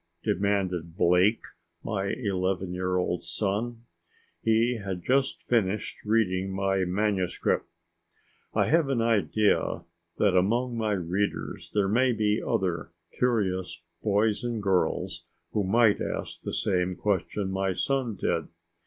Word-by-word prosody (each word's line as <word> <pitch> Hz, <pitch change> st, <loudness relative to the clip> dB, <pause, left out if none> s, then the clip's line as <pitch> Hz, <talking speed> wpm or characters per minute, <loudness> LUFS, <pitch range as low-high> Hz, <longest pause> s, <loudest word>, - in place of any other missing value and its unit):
demanded 95 Hz, -4 st, -1 dB
Blake, 90 Hz, +6 st, +4 dB, 0.4 s
my 100 Hz, -3 st, -2 dB
eleven 95 Hz, -4 st, -1 dB
year 90 Hz, 0 st, -1 dB
old 90 Hz, -1 st, 0 dB
son. 105 Hz, +7 st, -2 dB, 0.6 s
He 115 Hz, +2 st, +2 dB
had 95 Hz, -3 st, -4 dB
just 135 Hz, +1 st, +1 dB
finished 105 Hz, -3 st, 0 dB
reading 95 Hz, -4 st, +1 dB
my 95 Hz, -1 st, 0 dB
manuscript. 95 Hz, 0 st, 0 dB, 0.8 s
I -, -, +2 dB
have 160 Hz, -2 st, +3 dB
an 135 Hz, -3 st, +1 dB
idea 110 Hz, -2 st, +1 dB, 0.3 s
that 100 Hz, -3 st, +3 dB
among 120 Hz, +7 st, +2 dB
my 110 Hz, -2 st, 0 dB
readers 95 Hz, +2 st, -2 dB
there 100 Hz, -2 st, +3 dB
may 125 Hz, +5 st, +3 dB
be 105 Hz, -1 st, +1 dB
other 95 Hz, -9 st, -1 dB, 0.2 s
curious 95 Hz, -8 st, -1 dB, 0.2 s
boys 105 Hz, +2 st, +1 dB
and 120 Hz, -2 st, -2 dB
girls 95 Hz, -2 st, 0 dB, 0.3 s
who 105 Hz, -, 0 dB
might 110 Hz, +2 st, +3 dB
ask -, -, -4 dB
the -, -, -4 dB
same 90 Hz, -3 st, 0 dB
question 100 Hz, 0 st, -1 dB
my 95 Hz, 0 st, 0 dB
son 130 Hz, -, 0 dB
did. -, -, -1 dB
100 Hz, 125 wpm, -27 LUFS, 95-115 Hz, 0.8 s, Blake